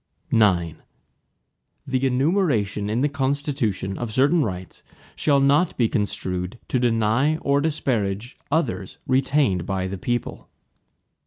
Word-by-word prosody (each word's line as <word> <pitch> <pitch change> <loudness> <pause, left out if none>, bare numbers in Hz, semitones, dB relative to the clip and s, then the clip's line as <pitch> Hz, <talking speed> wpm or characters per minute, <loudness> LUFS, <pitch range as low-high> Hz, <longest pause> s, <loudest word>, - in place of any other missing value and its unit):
IX 85 -8 +2 1.1
The 135 0 0
enumeration 125 - +1
in 115 +4 0
the 145 - +3
Constitution, 135 -8 -2
of 120 -2 -4
certain 140 +8 +3
rights, 95 -4 -6 0.3
shall 145 -2 +2
not 140 +6 +3
be 120 - +3
construed 95 -1 -2
to 130 - +1
deny 120 +5 +2
or 140 -2 +1
disparage 120 -8 -1
others 115 - -1
retained 130 - +1
by 95 -1 -1
the 95 0 -5
people. 120 +3 -3
120 Hz, 115 wpm, -23 LUFS, 100-140 Hz, 1.1 s, the